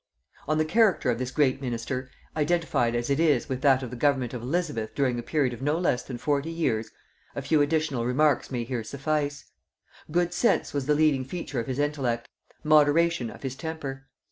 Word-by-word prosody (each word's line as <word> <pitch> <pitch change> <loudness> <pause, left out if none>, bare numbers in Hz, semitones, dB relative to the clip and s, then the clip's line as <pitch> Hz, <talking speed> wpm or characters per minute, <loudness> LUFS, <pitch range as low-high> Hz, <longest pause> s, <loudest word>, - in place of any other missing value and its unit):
On 155 +1 +1
the 155 - +2
character 185 - +3
of 115 - -2
this 130 -1 -2
great 135 -1 +1
minister, 125 +1 -3 0.3
identified 155 -7 +1
as 120 +3 -1
it 140 - +2
is 150 -7 +3
with 130 -2 -3
that 135 -2 +4
of 125 - -6
the - - -5
government 130 -2 +1
of 125 - -5
Elizabeth 135 -5 -2
during 130 -4 +1
a - - -2
period 135 0 0
of 120 - -9
no 145 +3 +1
less 170 -8 +1
than 125 - -7
forty 145 +4 0
years, 135 -10 -1 0.5
a - - -3
few 150 +2 +3
additional 145 -4 0
remarks 140 +1 +2
may 125 -3 -2
here 120 -1 -3
suffice. 145 +1 -2 0.6
Good 175 +2 +1
sense 235 +6 +1
was 140 -2 -2
the 150 - +4
leading 150 -3 +3
feature 135 -2 -4
of 115 - -4
his 130 -1 -3
intellect; 135 -5 -1 0.4
moderation 155 -2 +4
of - - -12
his 135 -1 -3
temper. 140 -4 -6
140 Hz, 195 wpm, -27 LUFS, 125-155 Hz, 0.6 s, that